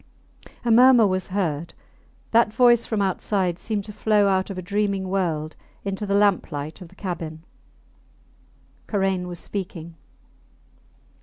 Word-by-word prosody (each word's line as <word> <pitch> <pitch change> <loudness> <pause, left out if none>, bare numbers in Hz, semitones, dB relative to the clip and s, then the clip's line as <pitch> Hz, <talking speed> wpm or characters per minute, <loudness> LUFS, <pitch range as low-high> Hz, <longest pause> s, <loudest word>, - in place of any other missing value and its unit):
A 235 - +2
murmur 245 0 +7
was 185 -2 -1
heard; 170 -5 -2 0.6
that 230 -1 +4
voice 240 +1 +4
from 215 -3 0
outside 185 -2 -1
seemed 210 -3 -3
to 210 +1 -9
flow 210 -1 +2
out 190 0 +1
of 195 - -6
a - - -3
dreaming 200 0 -1
world 160 -5 -1 0.3
into 200 +1 -3
the 200 - +1
lamp 200 -3 +2
light 150 +4 -6
of 180 - -9
the - - -20
cabin. 165 -4 -6 1.4
Karain 190 -3 0
was 175 -1 -6
speaking. 175 -3 -6
195 Hz, 140 wpm, -23 LUFS, 175-210 Hz, 1.4 s, murmur